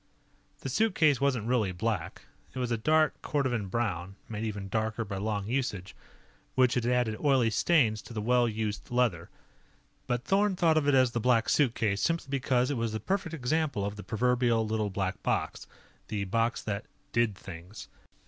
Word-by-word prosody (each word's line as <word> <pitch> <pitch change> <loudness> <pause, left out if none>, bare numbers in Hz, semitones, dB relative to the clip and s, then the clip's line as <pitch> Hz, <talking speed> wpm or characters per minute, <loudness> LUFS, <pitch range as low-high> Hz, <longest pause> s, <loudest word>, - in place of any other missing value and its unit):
The 135 - -4
suitcase 155 - +3
wasn't 130 -6 +1
really 115 -5 +1
black. 100 -1 -3 0.3
It - - -6
was 125 -1 -1
a - - +3
dark 155 +5 +2
cordovan 125 -8 -1
brown, 95 -4 -2
made 110 -1 -5
even 105 -3 -4
darker 110 +2 -1
by 100 -1 -5
long 105 0 -2
usage, 105 -7 -2 0.6
which 125 -2 +4
had 120 -1 0
added 120 -3 +1
oily 130 -6 +3
stains 110 -6 +3
to - - -13
the 110 - -3
well 120 +2 +3
used 105 -1 -4
leather. 120 -9 0 0.8
But 120 0 -1
Thorn 200 +3 +2
thought 165 -3 +3
of 145 - -2
it 145 - +4
as 130 -2 +4
the 120 - -1
Black 115 -1 +2
Suitcase 115 -7 +2
simply 165 -4 0
because 130 -1 +1
it 140 - -1
was 115 -1 -1
the 110 - -2
perfect 170 - -2
example 140 -5 0
of 100 +1 -3
the 105 - -7
proverbial 120 0 +1
Little 110 -1 -1
Black 95 -1 -3
Box - - -2 0.4
the 105 -2 -2
box 115 +4 0
that 105 0 -4 0.2
Did 115 -3 +1
Things. 90 +2 -10
115 Hz, 175 wpm, -29 LUFS, 105-130 Hz, 0.8 s, which